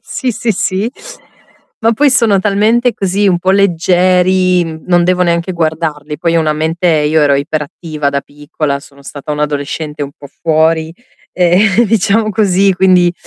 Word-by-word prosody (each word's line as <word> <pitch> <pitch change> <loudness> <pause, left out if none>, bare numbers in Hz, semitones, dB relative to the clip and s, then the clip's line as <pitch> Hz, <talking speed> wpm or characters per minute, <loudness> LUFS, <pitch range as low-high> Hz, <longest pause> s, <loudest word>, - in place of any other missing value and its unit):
sì, 260 - -3
sì, 230 0 -2
sì. 195 +3 -2 0.9
Ma 230 - +2
poi 285 +5 +2
sono 230 -6 +3
talmente 215 +5 +1
così, 195 +1 0
un 180 -3 +2
po' 185 +2 0
leggeri, 185 -1 +2
mhmm, 160 -1 -8
non 175 -1 +3
devo 180 0 +1
neanche 170 +1 0
guardarli; 155 -3 -3
poi 170 0 0
ho - - +3
una 155 -1 0
mente 160 +3 -2
io 155 -1 +2
ero 145 -1 +3
iperattiva 150 +1 -3
da 140 0 -1
piccola, 145 0 -4
sono 140 0 -18
stata 145 +1 -7
un'adolescente 150 +1 -4
un 140 0 -6
po' 140 - -12
fuori, 160 0 +1 0.4
ehm, 185 +5 +3
diciamo 215 0 +1
così, 195 -2 +2
quindi, 180 -1 +3
175 Hz, 160 wpm, -13 LUFS, 155-195 Hz, 0.9 s, sono